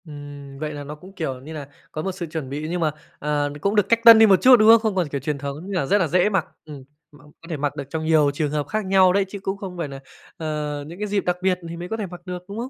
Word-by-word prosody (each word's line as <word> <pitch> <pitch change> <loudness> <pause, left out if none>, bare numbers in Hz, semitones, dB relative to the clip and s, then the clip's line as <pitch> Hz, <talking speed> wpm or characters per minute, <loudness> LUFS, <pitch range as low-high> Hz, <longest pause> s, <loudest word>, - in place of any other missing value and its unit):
Ừm, 145 -2 -10
vậy 155 0 -4
là 145 -1 -6
nó 145 +1 -8
cũng, 185 +6 -15
kiểu 135 -8 -4
như 155 +4 -9
nà, 145 -3 -7 0.2
có 155 - -4
một 190 - -2
sự 185 -1 -6
chuẩn 155 -4 -6
bị, 150 +3 -4
nhưng 175 0 -2
mà, 155 -2 +2 0.3
à, 145 0 -1
cũng 200 +4 0
được 210 -2 +2
cách 230 - +4
tân 230 -1 +11
đi 225 - +8
một 195 -3 +4
chút, 255 0 +8
đúng 215 0 +5
không? 230 0 +9
Không 220 -3 -1
còn 180 -4 +1
kiểu 140 -1 -4
truyền 150 +2 -2
thống 140 0 -5
nên 195 - -8
là 180 -8 0
rất 200 - +3
là 185 -5 +1
dễ 180 +5 +2
mặc. 190 -6 0 0.2
Ừm, 145 -4 -10 0.3
mặc 145 -1 -19 0.2
có 165 - -14
thể 160 - -3
mặc 145 0 -2
được - - -4
trong 160 +1 -4
nhiều 155 -3 +4
trường 145 0 -2
hợp 150 -2 -2
khác 215 -1 -2
nhau 190 -1 +4
đấy, 200 0 +2
chứ 200 - -7
cũng 195 +1 -3
không 190 -3 -8
phải 165 -3 -3
nà, 135 -1 -8 0.4
ờ, 150 -3 -3
những 170 +4 -10
cái 210 - -2
dịp 200 -1 -1
đặc 180 0 0
biệt 185 -1 +1
thì 170 - -7
mới 175 +1 -6
có 225 - -3
thể 215 - -3
mặc 175 -1 -11
được, 180 -1 -6
đúng 200 +1 -8
không? 245 +2 -4
165 Hz, 320 wpm, -22 LUFS, 145-195 Hz, 0.4 s, tân